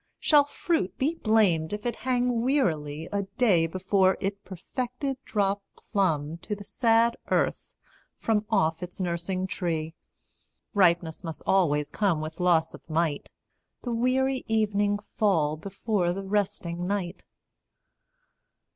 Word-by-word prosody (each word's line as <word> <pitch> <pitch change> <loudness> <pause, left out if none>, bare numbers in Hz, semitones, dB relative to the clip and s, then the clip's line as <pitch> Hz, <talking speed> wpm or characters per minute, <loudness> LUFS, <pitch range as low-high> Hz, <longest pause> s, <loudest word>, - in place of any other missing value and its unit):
Shall 295 -2 +5
fruit 290 - -1
be 290 +5 +1
blamed 210 - +2
if 210 +2 -5
it 240 - -1
hang 245 -2 0
wearily 160 - 0
A 200 -1 0 0.2
day 185 -10 +4
before 190 +2 +2
it 200 0 -3
perfected 250 - -4
drop 200 -1 0 0.2
plumb 165 -6 -1
To 210 - -4
the 200 - -10
sad 230 +2 +2
earth - - 0 0.4
from 215 -2 +1
off 165 -6 +1
its 180 +1 -7
nursing 185 +1 -2
tree? 165 -4 -2 0.8
Ripeness 170 -4 +2
must 165 -2 -6
always 150 -6 +2
come 195 -7 +1
with 155 +2 -6
loss 175 -3 +3
of - - -11
might. 155 -2 -1 0.5
The 245 - -2
weary 260 +3 +1
evening 205 -2 +1
fall 190 -7 0
before 195 +1 -1
the 195 +2 -5
resting 180 -3 -2
night. 190 -2 -3
195 Hz, 130 wpm, -27 LUFS, 170-225 Hz, 0.8 s, Shall